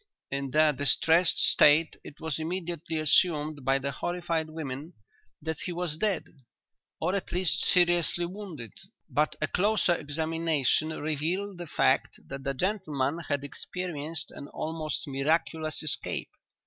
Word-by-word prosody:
In 140 0 -1
their 155 +2 +4
distressed 145 +4 +3
state 155 +2 +5
it 145 - -12
was 160 -1 -3
immediately 170 -1 -3
assumed 155 -1 +2
by 135 +1 +3
the 140 +1 -3
horrified 170 +1 -2
women 155 0 -6 0.5
that 160 -1 -3
he 180 - -4
was 175 -3 -2
dead, 205 -4 +1 0.8
or 180 +4 0
at 200 - -3
least 180 -2 +1
seriously 175 -1 +3
wounded, 175 - -7 0.4
but 150 +1 +1
a 155 - +2
closer 200 0 +2
examination 160 -1 0
revealed 160 +6 -2
the 175 - -6
fact - - +1
that 135 0 -6
the 135 -1 -2
gentleman 160 -5 -1
had 145 -1 0
experienced 155 +1 -4
an 140 - -9
almost 155 0 -3
miraculous 155 +3 0
escape. 155 - -3
160 Hz, 135 wpm, -28 LUFS, 145-175 Hz, 0.8 s, state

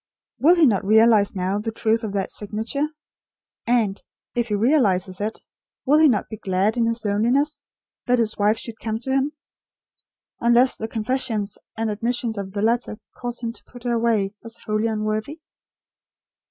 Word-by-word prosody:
Will 335 +5 +6
he 335 -3 +5
not 210 -6 +2
realise 215 0 +4
now 190 +2 -1
the 225 +2 -3
truth 225 +1 0
of 215 - -3
that 195 -2 -2
signature; 220 +8 -2 0.8
and, 225 -5 +1 0.3
if 240 -1 0
he 210 - 0
realises 200 - +2
it, 215 +2 -4 0.4
will 295 +3 +5
he 315 - +7
not 220 -8 +1
be 220 - -7
glad 195 +3 0
in 235 -2 +2
his 230 -1 -2
loneliness, 240 +9 +1 0.5
that 250 0 +4
his 225 -2 +1
wife 210 +2 +2
should 225 -1 -8
come 220 -1 -2
to 255 +3 -5
him; 270 +3 +1 1.1
unless 240 +2 +4
the 220 - -4
confessions 220 -2 -2 0.2
and 225 -1 -1
admissions 230 +2 -1
of 195 -2 -6
the 205 0 -2
letter 230 -1 0 0.2
cause 245 -1 -5
him 230 -1 -3
to - - -15
put 245 -1 -14
her 240 -1 0
away 225 -4 +1
as 230 0 -7
wholly 215 +1 0
unworthy? 215 +7 -2
225 Hz, 170 wpm, -23 LUFS, 210-240 Hz, 1.1 s, he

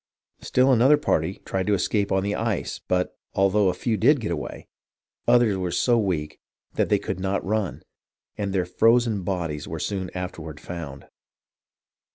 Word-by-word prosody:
Still 130 +1 +3
another 130 +5 +5
party 90 - -1
tried 95 0 -2
to 105 - +3
escape 100 +2 0
on 95 0 +2
the 100 +1 -1
ice, 110 -4 -2
but, 90 0 0 0.2
although 100 +1 +3
a 90 - -1
few 115 -3 -1
did 140 +6 +4
get 105 -6 -3
away, 80 - -5 0.6
others 120 -5 +4
were 90 -1 -2
so 120 +8 +2
weak 90 -9 -1 0.3
they - - +2
could - - -4
not 95 +1 -1
run, 105 -1 -2 0.5
and 100 -1 -3
their 95 -2 0
frozen 115 +2 +3
bodies 85 -5 -3
were 80 - -5
soon 95 +1 -3
afterward 80 -4 -6
found. 80 -6 -7
95 Hz, 160 wpm, -24 LUFS, 90-110 Hz, 0.6 s, another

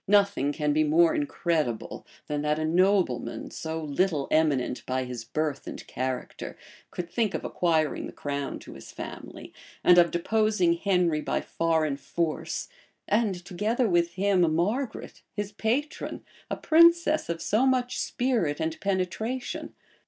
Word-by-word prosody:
Nothing 200 -8 +3
can 150 -1 0
be 155 +1 +3
more 165 +2 +4
incredible, 145 -5 -1 0.2
than 150 -1 -2
that 150 0 +1
a 155 - -1
nobleman, 175 -8 +1
so 160 0 -4
little 150 0 0
eminent 150 -6 +1
by 130 0 0
his 125 -2 -6
birth 150 +4 -3
and - - -7
character, 130 0 -4 0.3
could 175 - -5
think 215 +2 0
of - - -4
acquiring 160 -3 0
the - - -8
crown 140 -1 -4
to - - -11
his - - -11
family, - - -9 0.3
and 180 0 +7
of 170 -1 +5
deposing 200 0 +2
Henry 175 -3 +1
by - - -1
foreign 160 -4 0
force, 155 +3 -3 0.4
and, 205 -5 0
together 220 +7 0
with 175 -2 +2
him, 195 -1 +2
Margaret, 220 +8 -2
his 205 -1 -3
patron, 240 +8 -2 0.2
a - - -2
princess 335 - +4
of 170 0 -2
so 225 +9 +2
much 250 -1 +1
spirit 225 - 0
and 160 0 -2
penetration. 205 +7 -2
170 Hz, 145 wpm, -27 LUFS, 150-205 Hz, 0.4 s, and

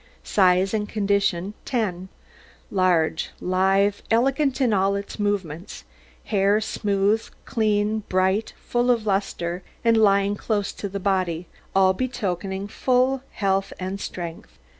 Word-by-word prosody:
SIZE 185 0 +3
AND 210 -1 -1
CONDITION 200 -2 0
10 190 -7 -2 0.6
Large, 175 -4 +2
lithe, 195 +2 +2
elegant 270 +4 +2
in 250 -5 +3
all 195 0 +2
its 200 +2 -6
movements; 195 -5 -3 0.4
hair 200 0 +2
smooth, 205 0 0 0.2
clean, 215 -1 +1
bright, 190 +3 +1
full 240 +1 -1
of 235 -3 +2
lustre, 190 -3 -1 0.2
and 230 0 +5
lying 200 -2 +4
close 205 -1 -2
to 200 - -5
the 200 +1 -4
body, 185 -3 0 0.3
all 190 -1 +5
betokening 195 -5 -3
full 255 +4 +1
health 195 -1 0
and 190 +1 -4
strength. 170 -2 -7
200 Hz, 120 wpm, -24 LUFS, 185-215 Hz, 0.6 s, and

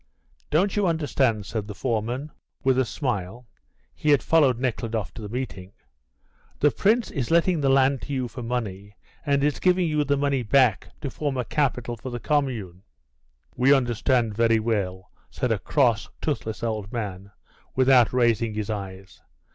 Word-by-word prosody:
"Don't 185 +6 +2
you 205 -2 +2
understand?" 135 - 0
said 105 0 -4
the 105 - -7
foreman, 120 +6 -2 0.3
with 130 -1 +3
a 130 - +2
smile 120 - -4 0.5
(he 150 - -2
had 145 -3 +4
followed 145 -7 +4
Nekhludoff 115 -4 -2
to - - -9
the 105 - -6
meeting), 100 -6 -5 0.9
"the 145 - +4
Prince 220 +3 +1
is 130 -5 -3
letting 170 0 +3
the 135 - +2
land 135 0 +3
to 145 - -6
you 130 -2 -1
for 120 +2 -8
money, 105 -4 -4 0.3
and 140 -1 +2
is 145 0 +1
giving 180 -1 +3
you 150 -1 +1
the 140 0 +1
money 140 -2 +1
back 120 -1 +3
to 140 - -4
form 145 -1 -3
a 125 - -1
capital 125 -3 -1
for 120 +3 -8
the 120 -1 -5
commune." 115 - -1 0.7
"We 130 +3 +5
understand 120 -2 +1
very 115 0 +3
well," 100 -5 -2 0.2
said - - -2
a - - +1
cross, - - +1
toothless 110 +1 -3
old 110 -3 -3
man, 100 -4 -5 0.5
without 130 -2 +5
raising 115 -3 +1
his 110 0 -3
eyes. 95 -2 -7
125 Hz, 165 wpm, -25 LUFS, 110-140 Hz, 0.9 s, We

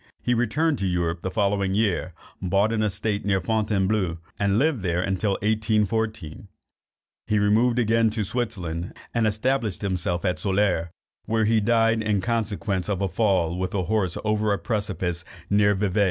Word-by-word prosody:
He 125 - +2
returned 135 +6 +1
to 95 - 0
Europe 85 -1 -1
the 95 - -2
following 100 -1 0
year, 100 -5 0 0.3
bought 100 +4 +2
an 110 - 0
estate 105 0 -1
near 100 -1 +1
Fontainebleau, 100 -3 0 0.2
and 100 0 +2
lived 140 -2 +2
there 90 -1 0
till 100 +1 0
1814. 110 -4 -1 0.8
He 105 - +2
removed 110 +4 +3
again 115 -1 +3
to 110 0 -2
Switzerland, 95 -6 -3 0.2
and 115 -2 +2
established 110 -1 -1
himself 90 -1 -1
at 90 -1 0
Soleure, 95 -4 +1 0.4
where 110 0 +1
he 110 +1 +3
died, 115 +1 +2
in 105 -2 +1
consequence 105 -3 -2
of 100 -3 -1
a 100 - 0
fall 90 -3 +1
with 95 - -2
his 95 -3 -1
horse 100 -4 0
over 105 0 +1
a 100 - +2
precipice 95 -3 -2 0.3
near 100 0 +4
Vevay. 100 0 0
105 Hz, 160 wpm, -24 LUFS, 95-110 Hz, 0.8 s, near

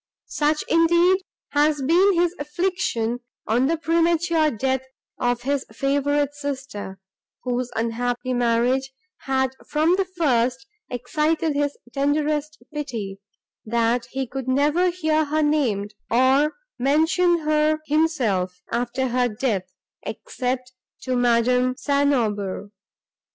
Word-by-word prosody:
Such, 300 +1 0
indeed, 340 +3 +4 0.3
had 300 +1 +3
been 365 +7 +5
his 345 0 +2
affliction, 290 -7 -1 0.3
on 240 +4 +2
the 330 +2 +1
premature 330 -1 +2
death 265 +1 -1 0.4
of 245 -1 0
this 280 +1 0
his - - -19
favourite 285 +1 +1
sister, 265 -9 -6 0.4
whose 250 0 -1
unhappy 240 +2 -1
marriage 245 +2 +1 0.4
had 265 -1 +1 0.2
from 315 +4 +3
the 390 - +1
first 255 -4 +1 0.2
excited 300 +6 0
his 285 0 -1 0.2
tenderest 295 +2 0 0.2
pity, 230 -10 -5 0.4
that 235 +1 0
he 265 -1 -3 0.2
never 290 +7 +2
could 355 -1 0
hear 315 -3 +1
her 305 +1 0
named, 235 -9 0 0.2
or 265 +5 +3 0.2
mention 320 +6 +3
her 305 0 +2
himself 245 - 0
after 245 +2 -1
her 245 0 +2
death, 210 -5 -2 0.3
except 255 +3 -4 0.3
to 255 -1 -2
Madame 250 +1 +2
St. 285 0 +2
Aubert. 205 -5 -1
270 Hz, 115 wpm, -23 LUFS, 245-310 Hz, 0.4 s, been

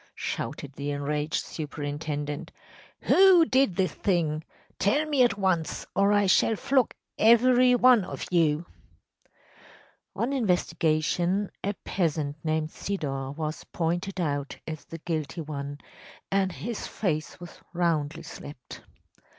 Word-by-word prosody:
‚ÄĚ - - -28
shouted 140 -1 -4
the 140 +1 -4
enraged 150 +2 -1
superintendent. 145 -1 -4 0.5
“Who 375 -3 +6
did 260 - +2
this 185 -3 0
thing? 160 -5 0 0.4
Tell 285 +11 +2
me 290 -4 +1
at 240 -4 +4
once, 185 -5 0
or 200 +1 +4
I 205 -1 +4
shall 195 +3 +4
flog 260 +3 +1 0.2
every 250 +2 +6
one 245 -3 +6
of - - -6
you!‚ÄĚ 165 -1 -2 0.8
On 250 +4 -1
investigation, 180 - +1
a 200 +1 -1
peasant 155 -5 -1
named 155 -1 0
Sidor 135 -8 -3
was 155 -1 -4
pointed 175 +3 -2
out 145 -4 -2
as 155 -2 -6
the 165 - -8
guilty 160 -1 -3
one, 145 -2 -5 0.5
and 195 -1 +2
his 220 +5 -5
face 155 -6 -2
was 175 -1 -11
roundly 165 -4 0
slapped. 140 -4 -10
170 Hz, 125 wpm, -27 LUFS, 150-205 Hz, 0.8 s, Who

